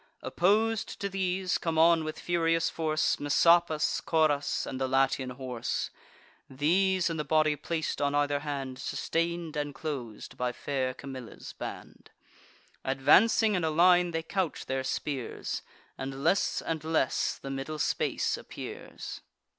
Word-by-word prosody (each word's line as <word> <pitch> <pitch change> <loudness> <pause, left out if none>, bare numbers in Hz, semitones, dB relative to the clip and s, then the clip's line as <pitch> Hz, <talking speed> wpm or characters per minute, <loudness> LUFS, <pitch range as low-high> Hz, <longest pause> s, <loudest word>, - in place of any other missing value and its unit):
Oppos'd 215 +4 +1
to 200 - -2
these, 185 -1 0
come 165 -2 -2
on 165 0 +5
with 155 0 -5
furious 165 -1 +1
force 155 -1 0
Messapus, 165 +2 +3
Coras, 155 -3 +1
and 130 - -5
the 130 - +1
Latian 135 0 +1
horse; 125 -2 -3 0.6
These 180 +7 +2
in 165 - -3
the 150 - -1
body 155 0 +3
plac'd, 160 +2 -3
on 145 0 +1
either 145 0 +2
hand 135 -3 -4
Sustain'd 165 +2 -2
and 145 -1 -3
clos'd 135 -7 -6
by 125 0 -1
fair 130 -2 -2
Camilla's 130 -4 -9
band. - - -8 0.7
Advancing 205 +11 +4
in 180 -4 0
a 160 - +2
line, 175 +2 +5
they 165 -1 -2
couch 185 0 -2
their 130 0 -2
spears; 135 -1 -3 0.4
And 135 +1 -5
less 195 - +2
and 160 -2 -3
less 160 -4 +1
the 135 - -7
middle 135 +3 -4
space - - 0
appears. - - -8
155 Hz, 140 wpm, -29 LUFS, 135-170 Hz, 0.7 s, on